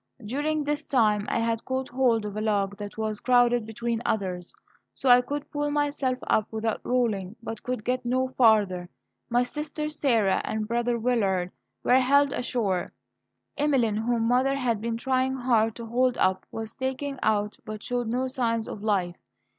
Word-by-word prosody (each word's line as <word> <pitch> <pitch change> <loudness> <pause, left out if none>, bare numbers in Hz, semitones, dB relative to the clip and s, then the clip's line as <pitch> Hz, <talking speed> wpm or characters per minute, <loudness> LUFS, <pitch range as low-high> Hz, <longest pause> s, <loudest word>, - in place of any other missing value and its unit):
During 295 +6 -1
this 295 +1 -2
time 215 -5 +2
I - - 0
had 230 0 0
caught 260 0 -3
hold 245 -4 +2
of 205 -1 -5
a 215 - -2
log 205 -2 0
that 205 0 -7
was 215 -1 -2
crowded 245 -2 +3
between 230 +1 -2
others, 180 -4 -2 0.4
so 270 - 0
I 245 0 +8
could 290 +3 -5
pull 290 0 -1
myself 290 -3 0
up 215 - +1
without 220 0 -2
rolling, 220 -6 0
but 225 -2 -6
could 250 -3 -4
get 255 +1 0
no 255 +2 0
farther. 210 -8 +3 0.4
My 245 +1 +3
sister 300 +3 -4
Sarah 235 -10 +2
and 215 0 -3
brother 235 +1 0
Willard 200 -7 0 0.3
were 255 - +5
helped 280 +2 +3
ashore. 205 -8 -1 0.7
Emeline, 260 -8 +2
whom 230 +1 0
mother 255 +3 +3
had 240 -6 0
been 230 0 -2
trying 260 +1 0
hard 230 -4 +2
to 235 - -7
hold 250 +2 +1
up, 185 0 +1
was 225 0 -6
taken 265 +1 -3
out, 210 -1 0
but 215 -1 -7
showed 245 -1 -2
no 250 +3 0
signs 235 -4 -1
of 205 - -7
life. 190 -5 0
235 Hz, 170 wpm, -26 LUFS, 215-260 Hz, 0.7 s, I